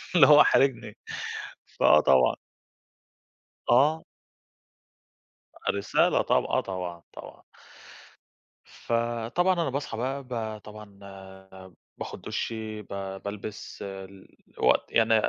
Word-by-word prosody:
اللي 150 -6 +8
هو 150 0 +9
حارِجني. 135 -2 +2 0.8
فآه 75 - +6
طبعًا 65 -4 +4 1.3
آه. 150 +6 +4 1.7
رسالة 100 0 +2
طب - - +2
آه - - 0
طبعًا، 90 -3 -6
طبعًا. - - -12 1.2
فطبعًا 120 +10 -1
أنا 165 -6 -1
باصحى 140 -4 -4
بقى 135 +4 -3
ب 110 -3 -4
طبعًا 105 -2 -13
آآ، 95 -1 -13 0.2
باخُد - - -7
دُشي، 110 -2 -4
ب - - -22 0.4
بالبَس، 105 +1 -7
ال 95 -1 -10 0.2
الوقت - - +2
يعني 115 0 +4
110 Hz, 100 wpm, -27 LUFS, 95-125 Hz, 1.7 s, هو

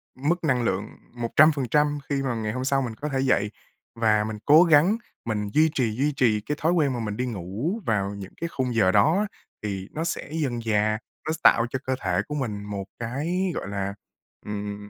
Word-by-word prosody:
mức 160 +7 0
năng 130 -6 +2
lượng 100 -1 -1 0.3
100% 145 +3 +3
khi 140 -1 0
mà 125 -3 -1
ngày 110 -1 -2
hôm 130 +3 -3
sau 135 0 +2
mình 120 -4 -4
có 150 +4 -4
thể 135 - -1
dậy. 105 -6 +2 0.4
Và 110 -2 +3
mình 110 0 -4
cố 155 +4 +8
gắng, 170 +6 +5 0.3
mình 105 -2 -2
duy 160 +1 +5
trì, 120 -5 +1
duy 145 +4 +1
trì 110 -5 +2
cái 150 +7 -3
thói 165 +2 +3
quen 150 -6 +2
mà 120 - -3
mình 105 -2 -3
đi 125 - -1
ngủ 115 - -3
vào 100 -3 0
những 100 -1 -9
cái 170 - 0
khung 130 -6 -2
giờ 95 -5 +4
đó 105 - +4
á, 210 - +1 0.4
thì 100 -2 -4
nó 160 - -3
sẽ 165 - -3
dần 140 -7 -1
dà, 110 -1 +1 0.3
nó 155 - +1
s - - -4
tạo 115 - +6
cho 130 - -3
cơ 130 0 0
thể 90 0 +1
của 150 - -4
mình 105 -7 -3
một 100 -2 -5
cái, 165 +11 -1
gọi - - -4
là, 100 0 -3 0.5
ừm, 105 0 -5
120 Hz, 220 wpm, -25 LUFS, 105-150 Hz, 0.5 s, cố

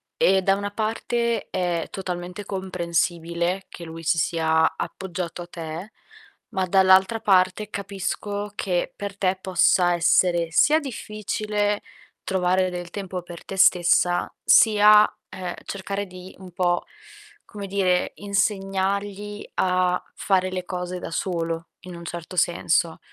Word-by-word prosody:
e 190 0 +4
da 195 +1 +3
una 205 0 -4
parte 230 +1 -1
è 175 -3 -1
totalmente 180 +1 -5
comprensibile 175 -1 -1
che 175 - -10
lui 165 0 -8
si 165 - +2
sia 160 -1 +2
appoggiato 180 -2 -5
a 175 - -8
te, 170 +3 -7 0.6
ma 190 -1 -1
dall'altra 190 +4 +4
parte, 190 +1 +2
capisco 200 +1 -4
che 180 -3 -1
per 200 -1 -6
te 190 -1 +1
possa 180 -1 +3
essere 175 0 +3
sia 305 - +5
difficile 215 -5 -2 0.4
trovare 185 0 +1
del 175 -1 -6
tempo 190 -2 -5
per 175 -1 -10
te 195 - -6
stessa 175 -1 +4
sia, 210 -1 +6 0.2
ehm, 180 -2 -5
cercare 200 +1 -4
di, 185 0 -12
un 185 -1 -11
po', 175 -1 0 0.6
come 205 -2 -8
dire, 185 -2 +1
insegnargli 200 0 -1
a 180 -1 +2
fare 185 -2 +1
le 185 -1 -3
cose 180 0 -4
da - - -6
solo, 165 -2 -2
in 180 -1 -9
un 170 - -9
certo 170 +1 -7
senso. 170 -1 +1
185 Hz, 130 wpm, -24 LUFS, 175-200 Hz, 0.6 s, sia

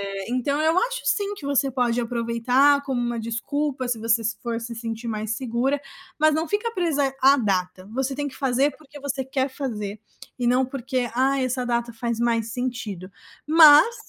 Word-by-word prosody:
Eh, 195 -1 -5
então 280 +4 0
eu 320 +2 +2
acho, - - 0
sim, 405 -1 +1
que 280 - -8
você 280 -1 +1
pode 245 -2 0
aproveitar 245 +4 +2
como 265 -3 -2
uma 240 -1 -2
desculpa, 260 +4 -2
se 240 -2 -2
você 230 +1 +2 0.2
for 235 -1 -3
se 235 0 -6
sentir 230 0 -5
mais 215 -1 -3
segura, 260 +3 -1 0.4
mas 310 0 +4
não 320 0 -1
fica 440 +3 -1
presa 290 -8 0
à 275 +1 +7
data. 185 -4 -1
Você 265 0 -1
tem 290 0 -2
que 275 - -7
fazer 270 +1 +1
porque 295 -1 -14
você 275 -1 -3
quer 265 +1 -1
fazer 215 -7 -5 0.4
e 245 - -3
não 250 +2 +3
porque: 255 -1 -3
"Ah, 265 +2 +2
essa 255 0 -1
data 235 -1 -1
faz 235 0 -3
mais 230 -1 0
sentido", 230 -7 -4 0.4
mas 310 +7 +8
255 Hz, 185 wpm, -24 LUFS, 230-285 Hz, 0.4 s, mas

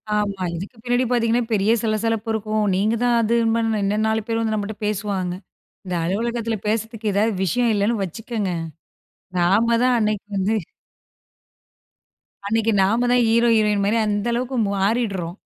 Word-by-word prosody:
ஆமா. 200 -2 -1
இதுக்கு 200 +8 -7
பின்னாடி 245 +1 +1
பாத்தீங்கன்னா, 235 0 +2
பெரிய 205 +2 +2
சலசலப்பு 225 0 -1
இருக்கும். 215 0 -1
நீங்க 215 +4 +1
தான் 240 -1 +3
அதுன்ப 230 0 +2 0.2
இன்னும் 210 +2 +1
4 220 0 +1
பேர் 225 0 0
வந்து 220 -1 0
நம்மட்ட 210 0 -3
பேசுவாங்க. 200 -3 -2 0.5
இந்த 180 -1 -3
அலுவலகத்துல 230 +4 -1
பேசறதுக்கு 220 0 -1
ஏதாவது 215 +3 +2
விஷயம் 230 +6 +1
இல்லைன்னு 205 +2 0
வச்சுக்கங்க, 210 +2 -4 0.9
நாம 215 +7 +3
தான் 255 -1 +3
அன்னைக்கு 210 -2 -1
வந்து, 195 +3 +1 1.9
அன்னைக்கு 225 +1 +1
நாம 225 +6 +2
தான் 245 0 +4
ஹீரோ, 235 +1 +3
ஹீரோயின் 210 -2 +2
மாரி 210 +3 +2
அந்த 205 0 -1
அளவுக்கு 250 +2 -2 0.2
மாறிடுறோம். 195 -3 -1
215 Hz, 140 wpm, -22 LUFS, 200-230 Hz, 1.9 s, தான்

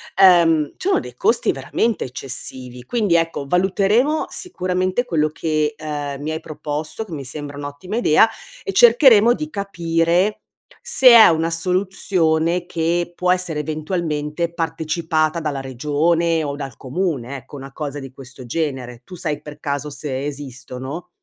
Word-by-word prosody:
ehm, 170 -5 +5
ci 370 - -5
sono 385 - +3
dei - - -10
costi - - +2
veramente 230 -2 -1
eccessivi. 125 -1 -6
Quindi, 210 - +1
ecco, 165 -4 0
valuteremo 200 - +2
sicuramente 185 - -1
quello 155 -9 +1
che, 155 -1 -1
ehm, 145 -2 -5
mi 155 +2 -3
hai 160 - -3
proposto, 155 +6 -5
che 185 - -10
mi 140 -3 -6
sembra 145 +2 -7
un'ottima 145 +9 -6
idea 225 -1 +5 0.3
e - - -3
cercheremo 235 0 +6
di 305 +4 -5
capire 175 - 0 0.4
se 475 - +6
è 235 -2 +10
una 165 0 +1
soluzione 175 -1 0
che 175 +1 -1
può 180 +1 +1
essere 180 -4 0
eventualmente 155 +1 -3
partecipata 160 0 -1
dalla 145 -3 -3
regione 155 +5 0
o 140 -1 -3
dal 135 -5 -6
comune, 140 -3 -3
ecco, 130 +3 -12
una 135 0 -9
cosa 145 -2 -5
di 135 -1 -9
questo 130 -1 -11
genere. 125 -3 -3
Tu 180 - -10
sai 155 -4 -3
per 150 0 -11
caso 145 0 -3
se 140 -1 -4
esistono? 135 +3 -6
160 Hz, 145 wpm, -20 LUFS, 145-180 Hz, 0.4 s, è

